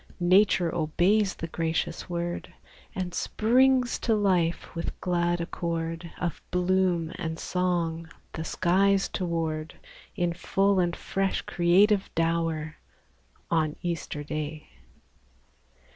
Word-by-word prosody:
Nature 180 Hz, -1 st, +4 dB
obeys 180 Hz, +6 st, +2 dB
the -, -, -5 dB
gracious 165 Hz, +2 st, -2 dB
word, 175 Hz, 0 st, -3 dB, 0.4 s
And 180 Hz, -2 st, -3 dB
springs 255 Hz, +2 st, +2 dB
to 225 Hz, -, +1 dB
life 180 Hz, -5 st, +1 dB
with 165 Hz, -, -5 dB
glad 175 Hz, -1 st, 0 dB
accord 170 Hz, 0 st, -3 dB
Of 175 Hz, -2 st, -3 dB
bloom 180 Hz, -2 st, +1 dB
and 160 Hz, -3 st, -3 dB
song 170 Hz, -3 st, -1 dB, 0.2 s
the 160 Hz, -, -4 dB
skies 190 Hz, +4 st, +2 dB
toward, 165 Hz, -3 st, -3 dB, 0.4 s
In 175 Hz, -3 st, 0 dB
full 195 Hz, +3 st, +1 dB
and 175 Hz, -1 st, +1 dB
fresh 195 Hz, 0 st, -1 dB
creative 190 Hz, +4 st, +3 dB
dower, 165 Hz, -2 st, 0 dB, 0.7 s
On 155 Hz, -2 st, +1 dB
Easter 165 Hz, -4 st, -3 dB
Day. 155 Hz, +1 st, -5 dB
175 Hz, 105 wpm, -27 LUFS, 165-190 Hz, 0.7 s, Nature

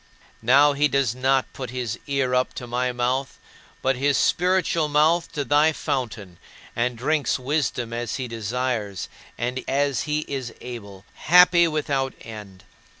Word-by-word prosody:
Now 140 Hz, +5 st, +5 dB
he 145 Hz, +1 st, +3 dB
does 140 Hz, -4 st, +1 dB
not 130 Hz, +1 st, +1 dB
put 130 Hz, -3 st, -6 dB
his 120 Hz, -2 st, -4 dB
ear 135 Hz, -3 st, 0 dB
up 125 Hz, 0 st, +1 dB
to 125 Hz, -, -6 dB
my 125 Hz, +1 st, -1 dB
mouth, 125 Hz, +2 st, -1 dB, 0.5 s
but 130 Hz, 0 st, +1 dB
his 140 Hz, +1 st, +2 dB
spiritual 180 Hz, -3 st, +2 dB
mouth 155 Hz, +3 st, +2 dB
to 145 Hz, -1 st, -2 dB
thy 150 Hz, +3 st, +4 dB
fountain, 115 Hz, -, -4 dB, 0.4 s
and 120 Hz, 0 st, -1 dB
drinks 145 Hz, +4 st, 0 dB
wisdom 130 Hz, -3 st, -2 dB
as 120 Hz, 0 st, -3 dB
he 130 Hz, -2 st, -4 dB
desires 115 Hz, -3 st, -3 dB, 0.3 s
and 125 Hz, +2 st, -3 dB
as 140 Hz, 0 st, +1 dB
he 150 Hz, 0 st, +1 dB
is 135 Hz, -5 st, -5 dB
able 100 Hz, -6 st, -9 dB
happy 180 Hz, +1 st, +5 dB
without 140 Hz, -4 st, -1 dB
end. 105 Hz, -4 st, -10 dB
130 Hz, 150 wpm, -24 LUFS, 120-145 Hz, 0.5 s, Now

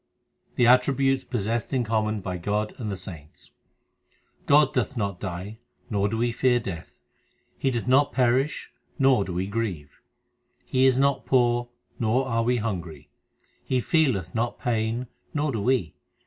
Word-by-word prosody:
The 120 Hz, -, +3 dB
attributes 135 Hz, +2 st, +3 dB
possessed 115 Hz, +1 st, -2 dB
in 125 Hz, -, +2 dB
common 110 Hz, -1 st, 0 dB
by 90 Hz, 0 st, -4 dB
God 105 Hz, +4 st, -2 dB
and 110 Hz, -4 st, -3 dB
the 100 Hz, -, -4 dB
saints: 85 Hz, -5 st, -10 dB, 1.0 s
God 145 Hz, -1 st, +5 dB
doth 130 Hz, +1 st, -1 dB
not 100 Hz, -4 st, -2 dB
die, 95 Hz, +3 st, -6 dB, 0.3 s
nor 100 Hz, -1 st, +1 dB
do 110 Hz, -, -2 dB
we 120 Hz, +1 st, +1 dB
fear 125 Hz, +1 st, +2 dB
death; 90 Hz, -8 st, -7 dB, 0.6 s
He 135 Hz, -, +1 dB
doth 120 Hz, -2 st, -3 dB
not 135 Hz, +3 st, +4 dB
perish, 130 Hz, +3 st, +1 dB, 0.3 s
nor 135 Hz, -6 st, +4 dB
do 95 Hz, -, -6 dB
we 90 Hz, +2 st, -1 dB
grieve. 95 Hz, -9 st, -4 dB, 0.6 s
He 130 Hz, 0 st, +3 dB
is 130 Hz, -1 st, +3 dB
not 140 Hz, 0 st, +1 dB
poor, 120 Hz, -2 st, +2 dB, 0.3 s
nor 125 Hz, +4 st, +1 dB
are 115 Hz, -2 st, +1 dB
we 125 Hz, +2 st, +1 dB
hungry; 90 Hz, -, -5 dB, 0.5 s
He 130 Hz, -, 0 dB
feeleth 120 Hz, -, +1 dB
not 120 Hz, +1 st, -1 dB
pain, 115 Hz, +1 st, -1 dB, 0.3 s
nor 150 Hz, 0 st, 0 dB
do 115 Hz, -5 st, -2 dB
we. 110 Hz, -, +1 dB
115 Hz, 155 wpm, -25 LUFS, 100-130 Hz, 1.0 s, God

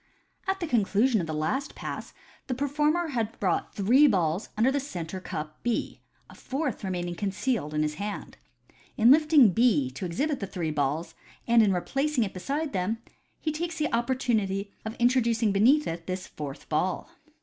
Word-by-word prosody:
— -, -, -34 dB
At 385 Hz, 0 st, 0 dB
the 345 Hz, -, -2 dB
conclusion 225 Hz, -, +2 dB
of 165 Hz, -, -4 dB
the -, -, -3 dB
last 260 Hz, -, -2 dB
Pass -, -, -6 dB, 0.4 s
the 255 Hz, -, -1 dB
performer 300 Hz, +5 st, +1 dB
had 230 Hz, -5 st, -2 dB
brought 185 Hz, -4 st, -1 dB
three 245 Hz, +9 st, +5 dB
balls 180 Hz, -, +1 dB
under 235 Hz, +5 st, +4 dB
the 285 Hz, -, +1 dB
centre 185 Hz, -, -5 dB
cup 155 Hz, -3 st, -6 dB
B, 240 Hz, -2 st, -2 dB, 0.3 s
a -, -, -14 dB
fourth 270 Hz, -4 st, -3 dB
remaining 175 Hz, -2 st, -2 dB
concealed 200 Hz, -, -2 dB
in 150 Hz, -, +2 dB
his 150 Hz, 0 st, -1 dB
hand. 205 Hz, 0 st, -5 dB, 0.6 s
In 230 Hz, +3 st, +6 dB
lifting 300 Hz, -, +6 dB
B 195 Hz, -, +3 dB
to 135 Hz, -, -8 dB
exhibit 275 Hz, -, -1 dB
the 200 Hz, -, -4 dB
three 170 Hz, -4 st, -3 dB
balls, 150 Hz, +3 st, -1 dB, 0.3 s
and 235 Hz, -1 st, +5 dB
in 210 Hz, -3 st, +4 dB
replacing 270 Hz, +8 st, 0 dB
it 195 Hz, -, -4 dB
beside 280 Hz, -, -3 dB
them, 195 Hz, +4 st, 0 dB, 0.4 s
he 310 Hz, -, -1 dB
takes 335 Hz, +2 st, -3 dB
the 305 Hz, 0 st, 0 dB
oppor 240 Hz, +3 st, +1 dB
tunity 200 Hz, -5 st, 0 dB
of 220 Hz, +1 st, -4 dB
introducing 235 Hz, -3 st, +2 dB
beneath 255 Hz, +10 st, +4 dB
it 165 Hz, 0 st, -5 dB
this 185 Hz, 0 st, -3 dB
fourth 145 Hz, -2 st, -8 dB
ball. 180 Hz, -, -1 dB
220 Hz, 180 wpm, -27 LUFS, 180-270 Hz, 0.6 s, In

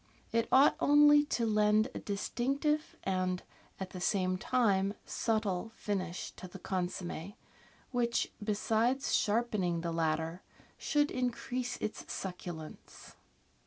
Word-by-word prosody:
It 230 Hz, 0 st, +1 dB
ought 270 Hz, +2 st, +6 dB
only 295 Hz, 0 st, +6 dB
to 235 Hz, -5 st, 0 dB
lend 215 Hz, +1 st, +3 dB
a -, -, -4 dB
distinctive 275 Hz, +9 st, -1 dB
and, 185 Hz, -1 st, -1 dB, 0.4 s
at 190 Hz, -1 st, -5 dB
the 180 Hz, -, -7 dB
same 185 Hz, -1 st, +1 dB
time, 200 Hz, -2 st, +1 dB
subtle 220 Hz, -2 st, -1 dB
finish 185 Hz, -4 st, -3 dB
to 185 Hz, -, -8 dB
the 180 Hz, -, -10 dB
consomm6, 180 Hz, 0 st, -4 dB, 0.6 s
which, 240 Hz, -2 st, 0 dB
besides 225 Hz, +5 st, +1 dB
sharpening 205 Hz, -6 st, +1 dB
the 170 Hz, 0 st, -2 dB
latter, 160 Hz, +1 st, -1 dB, 0.4 s
should 295 Hz, -1 st, +1 dB
increase 250 Hz, 0 st, -2 dB
its 215 Hz, -, -5 dB
succulence. 175 Hz, -4 st, -7 dB
210 Hz, 115 wpm, -32 LUFS, 185-245 Hz, 0.6 s, ought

